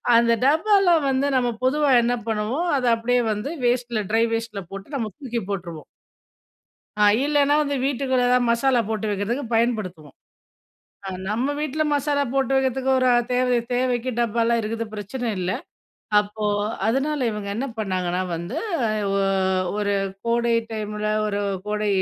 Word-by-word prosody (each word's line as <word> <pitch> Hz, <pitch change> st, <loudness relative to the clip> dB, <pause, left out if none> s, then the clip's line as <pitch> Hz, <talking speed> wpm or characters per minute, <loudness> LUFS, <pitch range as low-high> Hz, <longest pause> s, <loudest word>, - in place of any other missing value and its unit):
அந்த 235 Hz, 0 st, +4 dB
டப்பாலாம் 345 Hz, +2 st, +4 dB
வந்து 270 Hz, +1 st, +1 dB
நம்ம 245 Hz, -1 st, +1 dB
பொதுவா 285 Hz, +2 st, +2 dB
என்ன 240 Hz, +1 st, +1 dB
பண்ணுவோம் 225 Hz, +10 st, -1 dB
அதை 250 Hz, -2 st, 0 dB
அப்டியே 245 Hz, +2 st, +1 dB
வந்து 210 Hz, +6 st, -4 dB, 0.2 s
வேஸ்ட்டில, 240 Hz, -2 st, 0 dB
ட்ரை 225 Hz, +1 st, +3 dB
வேஸ்ட்ல 225 Hz, -3 st, -3 dB
போட்டு 195 Hz, +9 st, -7 dB
நம்ம 225 Hz, -4 st, -2 dB
தூக்கி 245 Hz, -4 st, -3 dB
போட்டுருவோம். 170 Hz, -5 st, -5 dB, 1.2 s
ஆ -, -, +7 dB, 0.2 s
இல்லைன்னா 290 Hz, -1 st, +3 dB
வந்து 285 Hz, -1 st, -1 dB
வீட்டுக்குள்ளே 260 Hz, -2 st, +1 dB
எதாவது 250 Hz, 0 st, +3 dB
மசாலா 240 Hz, +1 st, +3 dB
போட்டு 220 Hz, -1 st, -2 dB
வைக்கிறதுக்கு 210 Hz, +7 st, -2 dB
பயன்படுத்துவோம். 215 Hz, -10 st, -1 dB, 0.9 s
ஆ -, -, -3 dB, 0.2 s
நம்ம 245 Hz, +7 st, 0 dB
வீட்ல 305 Hz, +1 st, -1 dB
மசாலா 285 Hz, 0 st, +1 dB
போட்டு 270 Hz, -1 st, +1 dB
வைக்கிறதுக்கு 265 Hz, 0 st, 0 dB
ஒரு 255 Hz, -, +2 dB, 0.2 s
தேவை 250 Hz, 0 st, +2 dB, 0.2 s
தேவைக்கு 250 Hz, 0 st, 0 dB
டப்பாலாம் 235 Hz, 0 st, +1 dB
இருக்குது 225 Hz, +1 st, -3 dB
பிரச்சனை 215 Hz, +4 st, -4 dB
இல்ல. 180 Hz, 0 st, -1 dB, 0.7 s
அப்போ 210 Hz, +1 st, -2 dB, 0.4 s
அதனால 275 Hz, +6 st, 0 dB
இவங்க 210 Hz, -2 st, -5 dB
என்ன 245 Hz, +6 st, -2 dB
பண்ணாங்கன்னா 185 Hz, -3 st, -1 dB
வந்து, 170 Hz, -, -5 dB, 0.6 s
ஒ -, -, +1 dB, 0.6 s
ஒரு 205 Hz, -1 st, 0 dB, 0.3 s
கோடை 235 Hz, 0 st, +2 dB, 0.2 s
டைமில 210 Hz, -1 st, -4 dB, 0.2 s
ஒரு 205 Hz, -1 st, -1 dB, 0.3 s
கோடை 210 Hz, 0 st, -1 dB
235 Hz, 140 wpm, -23 LUFS, 210-265 Hz, 1.2 s, ஆ